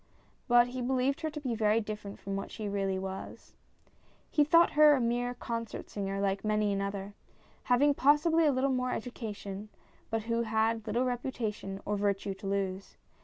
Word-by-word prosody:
But 240 -1 +5
he 255 +1 -5
believed 260 +2 0
her 315 - -1
to 300 - -6
be 260 -5 -2
very 215 0 +2
different 210 -2 -6
from 195 0 -5
what 195 - -4
she 215 -2 -5
really 195 -1 -1
was. 190 0 -7 0.8
He 300 - +4
thought 335 +3 +5
her 300 -1 +7
a - - 0
mere 245 +1 0
concert 230 -2 -5
singer 195 -1 -3
like 195 0 0
many 210 -1 +1
another, 200 0 -3 0.5
having 285 +4 +4
possibly 300 +4 +4
a - - +5
little 265 +1 +1
more 255 0 0
education, 210 -4 -6 0.4
but 225 -1 -1
who 230 +1 0
had 220 0 0
little 235 +4 +1
reputation 230 -6 -3
or 205 0 -1
virtue 200 -1 0
to 195 +1 -8
lose. 195 -1 -3
225 Hz, 170 wpm, -31 LUFS, 200-255 Hz, 0.8 s, her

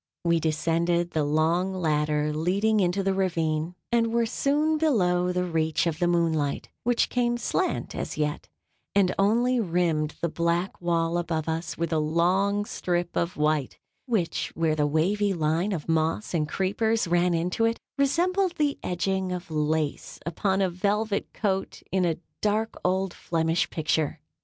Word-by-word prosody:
We 170 -1 +3
descended 170 +2 0
the 155 - 0
long 165 +6 +1
ladder 150 -3 0
leading 195 +8 +1
into 185 +1 +1
the 195 0 +1
ravine, 165 -3 -1 0.2
and 230 -1 +2
were 235 0 +2
soon 295 +6 +1
below 180 - +2
the 180 0 0
reach 160 -2 0
of 165 -2 -1
the 175 - +2
moonlight, 165 -4 0
which 240 0 +2
came 240 -1 0
slant 370 +9 -1
as - - -4
yet, 150 -1 -2 0.5
and 195 -3 +4
only 240 +5 +3
rimmed 165 -6 0
the 170 - 0
black 170 +3 -1
wall 170 0 +1
above 165 -2 -2
us 160 +1 -3
with 165 0 -1
a 160 - +2
long 185 +6 +1
strip 175 -3 -2
of 170 +1 -1
white, 150 -3 0 0.3
which, 210 -9 -1
where 160 -2 +1
the 150 -1 +1
wavy 195 +7 +1
line 165 +5 0
of 165 -6 -4
moss 165 +5 0
and 155 -3 0
creepers 220 +4 0
ran 175 0 +2
into 180 +7 0
it, 230 0 0 0.2
resembled 350 +7 +1
the 290 -2 0
edging 185 +1 -1
of 180 -2 -5
lace 155 -1 -1
upon 190 +4 0
a 190 - +2
velvet 200 +3 -1
coat 195 -3 -2
in 185 -1 +2
a 165 -2 0 0.2
dark 215 +2 0
old 190 0 0
Flemish 165 0 0
picture. 155 -1 -1
175 Hz, 155 wpm, -26 LUFS, 160-200 Hz, 0.5 s, and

